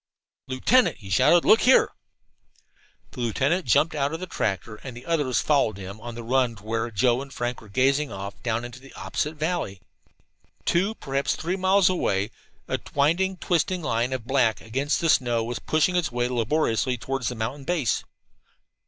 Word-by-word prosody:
"Lieutenant!" 215 - +3
he 100 -4 -11
shouted. 170 - +5
"Look 225 - +6
here!" 255 - +5 1.2
The 130 - -11
lieutenant 140 - 0
jumped 155 +7 +3
out 140 -2 0
of - - -6
the 185 - -4
tractor, 100 - -3
and 125 +1 -9
the 125 - -11
others 145 -7 +1
followed 135 -9 +2
him 100 +2 -8
on 120 0 -7
the 120 - -7
run 125 0 +1
to 100 - -16
where 115 +2 -2
Joe 120 +3 +2
and 140 0 -9
Frank 120 -2 -3
were 110 - -15
gazing 135 +6 +2
off 100 +1 -7
down 115 0 -1
into 120 +1 -9
the 135 +1 -15
opposite 95 +11 -3
valley. 155 - -2 0.9
Two, 195 +6 +1
perhaps 135 -5 -1
three, 175 +3 -2
miles 190 0 +3
away, 105 - 0 0.4
a - - -1 0.2
winding, 170 +7 +2
twisting 175 0 0
line 120 -2 0
of 130 -4 -3
black 120 -4 +2
against 135 +6 -1
the 165 - +1
snow 120 -5 +2
was 120 +1 -4
pushing 155 +3 +1
its 175 -7 +1
way 120 0 0
laboriously 125 0 0
around 135 -2 -2
the 125 - -1
mountain 115 +6 -4
base. 155 -6 0
130 Hz, 180 wpm, -25 LUFS, 115-155 Hz, 1.2 s, Look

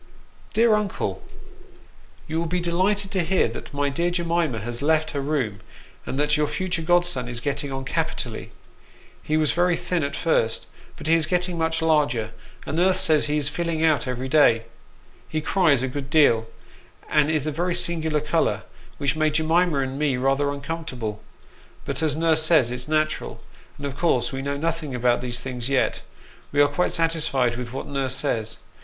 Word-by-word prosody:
" - - -28
DEAR 225 0 +5
UNOLE, 210 - -1 1.1
You 160 +1 -1
will 170 - -1
be 180 +2 0
delighted 190 +3 0
to 190 -4 +1
hear 185 +3 +2
that - - -8
my 145 -1 0
dear 170 +6 0
Jemima 170 -6 0
has 120 +2 -3
left 155 +1 +2
her 140 - -2
room, 135 -9 -1 0.5
and 130 - -3
that 150 +1 +2
your 150 -1 +1
future 180 +1 -2
godson 175 -6 +1
is 120 -1 -3
getting 140 +2 -2
on 135 0 -4
capitally. - - -3 0.7
He 155 - 0
was 155 -2 +2
very 175 +2 +2
thin 175 -4 -1
at 140 - -2
first, 115 -9 +1 0.3
but - - -10
he 160 - +3
is 165 -2 +3
getting 180 +1 0
much 160 0 0
larger, 145 -9 +2 0.3
and 155 - -3
nurse 185 +2 +3
says 155 -2 +3
he 150 +1 0
is 145 -2 0
filling 165 0 -2
out 155 -4 +2
every 125 +1 -3
day. 130 -5 +4 0.7
He 155 - -1
cries 155 -5 +2
a - - 0
good 135 +1 -5
deal, 130 -8 +4 0.6
and 150 -1 +3
is 155 -3 0
a 155 - -1
very 175 +4 -1
singular 160 -3 +1
colour, 150 - 0 0.3
which 140 -1 0
made 155 -1 +1
Jemima 160 -1 +2
and 135 +1 -3
me 145 -4 +1
rather 135 +2 +1
uncomfortable; 140 -7 -5 0.6
but - - -3
as 155 -3 +1
nurse 160 0 +3
says 155 -7 +4
it's 125 0 -4
natural, 155 0 -1 0.4
and 140 - -6
as 140 - -2
of 140 - -14
course 125 -8 +2
we 135 0 -4
know 140 +1 -2
nothing 160 -3 -2
about 120 0 +2
these 125 -1 -3
things 125 -1 -4
yet, 135 -2 +1 0.5
we 145 - 0
are 145 - +7
quite 180 - 0
satisfied 155 -7 +1
with 120 -1 -6
what 135 - -5
nurse 135 -2 -1
says. 115 -3 -1
150 Hz, 185 wpm, -24 LUFS, 135-165 Hz, 1.1 s, are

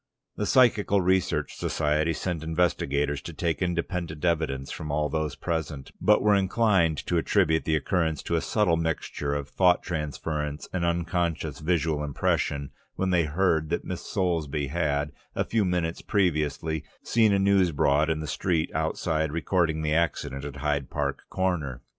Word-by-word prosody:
The 105 - -2
Psychical 105 -6 +4
Research 95 0 +1
Society 75 +1 0
sent 80 0 -3
investigators 75 -4 0
to 85 - -8
take 85 +1 -2
independent 85 -2 -2
evidence 75 -6 0
from 75 - -6
all 75 0 0
those 80 -1 -2
present, 80 -5 -4
but - - +4
were 105 0 +5
inclined 95 -5 +3
to 85 - 0
attribute 80 -2 +2
the 80 - +2
occurrence 80 0 0
to 85 - -1
a 80 - +1
subtle 105 -7 +2
mixture 80 -3 -2
of 70 -1 -3
thought 90 +3 +3
transference 75 -2 -3
and 95 -2 -1
unconscious 85 -3 -1
visual 80 -2 0
impression, 70 -1 -1 0.2
when 95 0 0
they 85 -2 +3
heard 80 -1 +1
that 85 - -2
Miss 90 - -5
Soulsby 80 -7 -1
had, 75 -2 0 0.2
a - - 0
few 110 -2 +1
minutes 90 -3 -1
previously, 80 -5 0 0.2
seen 110 -2 +3
a 100 - +3
news 95 -2 +3
board 75 +1 +2
in 80 -1 0
the - - -4
street 80 +2 0
outside 80 -2 -1
recording 80 -1 0
the 75 0 +1
accident 80 -4 -1
at 70 -2 -6
Hyde 70 -2 -1
Park - - -2
Corner. 85 -9 -2
80 Hz, 160 wpm, -27 LUFS, 75-90 Hz, 0.2 s, were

